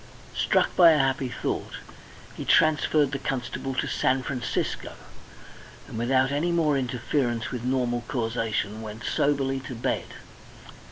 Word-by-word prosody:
Struck - - +2
by 170 -3 +8
a - - +3
happy 135 -1 +1
thought - - -3 0.6
he - - -5
transferred 155 -2 +3
the 135 - -3
constable 135 0 -3
to - - 0
San 130 0 +1
Francisco, 125 -2 -3 0.9
and - - -9
without 130 +3 +2
any 155 +5 0
more 160 -4 +2
interference 125 -2 -1
with 125 -2 -4
normal 125 -2 0
causation 115 -3 -2
went 110 +1 -8
soberly 135 -2 +1
to 130 -1 -7
bed. 115 - -1
130 Hz, 130 wpm, -26 LUFS, 120-140 Hz, 0.9 s, by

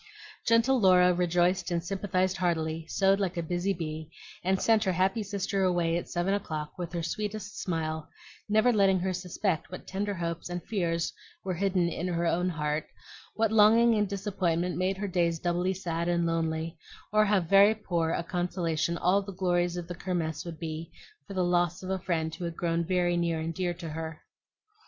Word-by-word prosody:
Gentle 230 +3 +4
Laura 180 -2 +6
rejoiced 175 +1 +1
and 170 -1 -1
sympathized 185 0 -1
heartily, 160 -3 -1
sewed 195 +2 +3
like 185 -3 -1
a 170 - -1
busy 175 +4 -1
bee, 160 -3 -4 0.3
and 190 +1 +1
sent 220 -1 +3
her 190 -3 +1
happy 190 +5 +1
sister 200 -1 -2
away 175 -2 +2
at 170 - -3
seven 175 +3 0
o'clock 155 -6 -3
with 175 -2 -5
her 170 -1 -2
sweetest 205 +1 -4
smile, 160 -3 -3 0.4
never 220 +4 +4
letting 195 -3 +4
her 185 0 0
suspect 180 -1 -2
what 180 - -8
tender 200 +1 -2
hopes 170 -1 -4
and 175 0 -4
fears 170 -6 -1 0.3
were 190 - -2
hidden 185 -1 +1
in 170 +1 -3
her 170 -1 -1
own 180 +2 +1
heart, 150 -2 -2 0.5
what 225 -1 +1
longing 225 +2 +6
and 210 -2 +1
disappointment 185 -3 -1
made 185 +1 0
her 205 +1 -3
days 170 -3 +1
doubly 175 +3 0
sad 170 -2 -2
and 170 -1 +1
lonely, 165 0 -1 0.3
or 215 0 +5
how 205 -1 +3
very 195 +5 +5
poor 175 -6 -1
a 170 - -1
consolation 170 -2 -1
all 185 +4 +3
the 200 0 -7
glories 175 -1 0
of 175 -1 -5
the 175 - -5
Kirmess 170 -3 -3
would 170 -2 -6
be 160 0 -5 0.4
for 195 - -7
the 185 - +2
loss 175 0 +1
of 185 - -4
a 190 - 0
friend 160 -3 -1
who 175 - -5
had 170 -1 -5
grown 170 -1 0
very 175 0 +1
near 170 -2 0
and 165 +1 -3
dear 175 -1 -2
to 170 -1 -7
her. 160 0 -6
175 Hz, 190 wpm, -29 LUFS, 170-195 Hz, 0.5 s, Laura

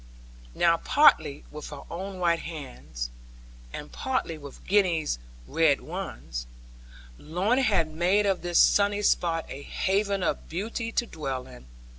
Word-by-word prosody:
Now 170 -1 +4
partly 155 - +4
with 150 0 -7
her 145 -2 -8
own 190 +3 -5
white 170 -2 +2
hands, 130 - -6 0.6
and 150 - -7
partly 260 -11 -2
with 145 -3 -11
Gwenny's 175 - +2 0.3
red 155 - +3
ones, - - -6 0.7
Lorna 195 - +1
had 200 -10 +3
made 185 +6 +3
of 195 -2 +1
this 175 -1 0
sunny 205 0 +4
spot 165 -4 +2
a 140 - -7
haven 195 +4 0
of - - -2
beauty 225 +6 -3
to 240 - 0
dwell 135 - -4
in. 125 - -13
170 Hz, 135 wpm, -27 LUFS, 150-200 Hz, 0.7 s, Now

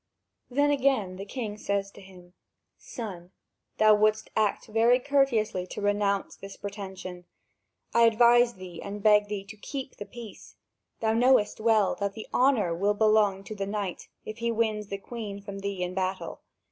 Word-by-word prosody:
Then 285 +3 +2
again 260 -10 +1
the 195 - -6
king 215 -3 -5
says 200 -1 -2
to - - -14
him: 180 -2 -16 0.5
"Son, 185 -7 -8 0.5
thou 215 0 +6
wouldst 215 +1 +2
act 215 -2 +1
very 230 +3 +3
courteously 240 -9 +1
to - - -7
renounce 205 -1 0
this 195 0 -10
pretension. 190 -3 -7 0.7
I 235 0 +6
advise 235 +1 +5
thee 180 -3 -9
and 200 0 -7
beg 210 -1 +5
thee 205 -1 -4
to 205 +2 -11
keep 265 +4 -7
the 205 - -7
peace. 235 -3 -11 0.5
Thou 220 -1 +2
knowest 240 -2 +3
well 220 -3 +3
that 200 -1 -1
the 220 - -8
honour 245 -10 +3
will 200 +5 +1
belong 210 -2 +3
to 215 - -7
the 195 -1 -3
knight, 200 -3 -4 0.2
if 215 +2 -7
he 235 0 0
wins 215 -2 -1
the 200 - -4
Queen 205 -1 -7
from 200 -1 -8
thee 195 -2 -3
in 180 0 -3
battle. 185 0 -3
210 Hz, 170 wpm, -27 LUFS, 195-230 Hz, 0.7 s, thou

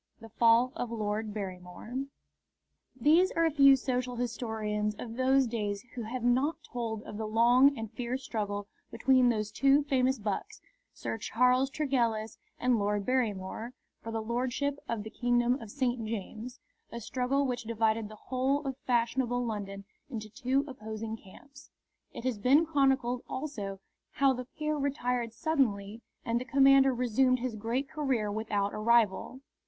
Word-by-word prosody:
IV. - - -37
THE - - -44
FALL 235 +2 +5
OF 245 -7 -3
LORD 215 -1 -2
BARRYMORE 195 +5 -6 0.9
These 325 +9 +5
are 330 0 +3
few 275 -2 +7
social 250 -1 -2
historians 220 -3 -2
of 225 +1 -7
those 265 +1 +3
days 210 -4 -3
who 245 - -5
have 235 +2 -5
not 260 +6 +2
told 230 -5 -4
of 205 - -8
the 220 0 -3
long 245 +5 +5
and 225 -1 -5
fierce 245 +3 -4
struggle 205 -2 -3 0.2
between 250 +2 +3
those 215 -2 -1
two 275 +1 +4
famous 265 -2 +1
bucks, 220 - -4 0.3
Sir 225 - -5
Charles 250 +5 +2
Tregellis 235 -7 -1 0.2
and 245 -2 +2
Lord 205 0 0
Barrymore, 230 -2 -1 0.3
for 225 - -6
the 225 -1 -2
Lordship 255 +5 -1
of 225 -3 -2
the 220 - -8
Kingdom 245 +1 +1
of 225 - -9
St. 245 -1 -1
James, 225 +3 -6 0.3
a 235 - -5
struggle 260 +4 0
which 245 -2 -3
divided 220 -1 0
the 215 - -10
whole 265 +5 -1
of 265 -1 -3
fashionable 245 0 +1
London 200 -3 -5 0.2
into 215 -5 -6
two 260 +5 0
opposing 220 -3 -6
camps. 280 +8 -16 0.4
It - - -8
has 250 -5 -1
been 275 +9 +5
chronicled 270 -5 +1
also 210 -9 -5 0.3
how 275 -1 +3
the 250 0 -5
peer 305 +4 -3
retired 250 -4 -1
suddenly 225 -7 -1 0.2
and 235 +1 0
the - - -5
commoner 270 0 +6
resumed 250 +1 +2
his 250 -2 -3
great 230 +6 -2
career 265 -9 -1
without 205 -2 -1
a - - -4
rival. 235 +2 +2
240 Hz, 155 wpm, -30 LUFS, 220-265 Hz, 0.9 s, few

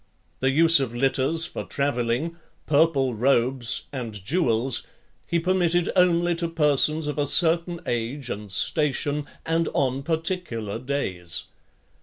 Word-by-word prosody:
The 130 - +1
use 165 +3 +6
of 125 -3 -3
litters 135 +5 +1
for - - -6
travelling, 140 +3 -1 0.3
purple 145 -4 +2
robes, 125 +1 +1
and 120 -5 -5
jewels, 125 - 0 0.4
he 170 - 0
permitted 175 0 +1
only 175 -1 +3
to 170 0 -1
persons 155 -1 +2
of 150 0 -3
a 145 - +1
certain 170 +3 +2
age 120 +3 -3
and 105 0 -6
station, 145 - 0 0.2
and 165 +1 0
on 135 -1 0
particular 160 - -3
days. 95 -11 -3
145 Hz, 125 wpm, -24 LUFS, 125-165 Hz, 0.4 s, use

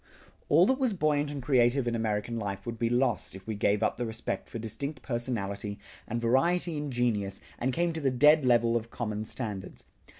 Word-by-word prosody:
All 165 +5 +6
that 265 +5 +2
was 255 -5 +2
buoyant 150 -4 +1
and 145 -3 -5
creative 125 -1 +3
in 120 - 0
American 110 0 -1
life 100 -2 -4
would 115 -1 -5
be 115 - +1
lost 120 -5 +1
if 95 0 -11
we 110 - -3
gave 105 +1 +1
up - - +1
the 120 - -2
respect 110 +1 -4
for - - -5
distinct 115 +6 -5
personality, 105 -5 -3 0.3
and 120 - -2
variety 165 +9 +2
in 145 -1 -3
genius, 110 -6 0 0.2
and 130 +2 0
came 170 +4 0
to 160 - -4
the 140 - +2
dead 150 +4 +5
level 120 -2 +3
of 115 0 -2
common 110 -3 -3
standards. 105 -6 -6
120 Hz, 200 wpm, -29 LUFS, 110-145 Hz, 0.3 s, All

